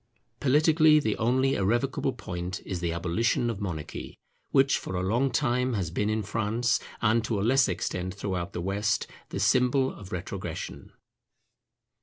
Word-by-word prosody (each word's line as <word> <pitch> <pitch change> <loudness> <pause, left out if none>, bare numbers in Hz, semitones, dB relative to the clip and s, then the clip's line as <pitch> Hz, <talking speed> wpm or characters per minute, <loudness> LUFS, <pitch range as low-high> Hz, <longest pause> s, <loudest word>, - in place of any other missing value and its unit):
Politically, 155 +2 +5
the 110 -8 0
only 130 +4 +2
irrevocable 110 +2 0
point 90 +1 -5
is 95 -3 -3
the 85 -1 -1
abolition 95 +8 0
of 105 -2 -7
monarchy, 85 -7 -5 0.3
which 135 0 +3
for 90 - -5
a 90 - -1
long 120 +8 +2
time 125 -1 +1
has 95 -7 -2
been 105 +4 0
in 110 0 0
France 115 +3 0 0.2
and 110 +1 +3
to 110 -2 -1
a - - 0
less 130 +2 +4
extent 90 -1 -3
throughout 95 -2 -3
the 85 - -3
West, 100 +3 0 0.2
the - - -4
symbol 130 +1 +3
of 95 -2 -11
retrogression. 90 -1 -6
110 Hz, 155 wpm, -27 LUFS, 95-125 Hz, 0.3 s, Politically